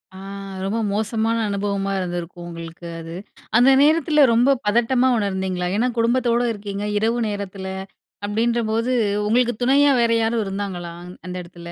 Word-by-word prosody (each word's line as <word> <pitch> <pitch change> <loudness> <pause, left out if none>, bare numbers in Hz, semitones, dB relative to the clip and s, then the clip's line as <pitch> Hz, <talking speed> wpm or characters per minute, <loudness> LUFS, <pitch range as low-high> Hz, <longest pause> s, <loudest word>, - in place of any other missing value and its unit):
ஆ, - - -10 0.5
ரொம்ப 210 +4 -1
மோசமான 220 +2 0
அனுபவமா 200 0 -1
இருந்திருக்கும் 175 -1 -5
உங்களுக்கு, 165 0 -9
அது. 165 +1 -8 0.4
அந்த 245 +3 +6
நேரத்தில 310 0 +4
ரொம்ப 245 +4 +4 0.2
பதட்டமா 240 +4 +3
உணர்ந்தீங்களா? 190 -3 -1
ஏனா, 245 +3 +2
குடும்பத்தோட 235 +1 +2
இருக்கீங்க, 200 -1 -5
இரவு 225 +3 +1
நேரத்தில 200 -2 -5 0.6
அப்படீன்ற 230 +3 0
போது, 230 +3 0 0.4
உங்களுக்கு 240 +2 +2
துணையா 280 +3 +5
வேற 235 - +3
யாரும் 225 0 +1
இருந்தாங்களா? 190 -3 -4 0.3
அந்த 180 0 -6
இடத்துல. 170 0 -11
210 Hz, 135 wpm, -22 LUFS, 190-235 Hz, 0.6 s, அந்த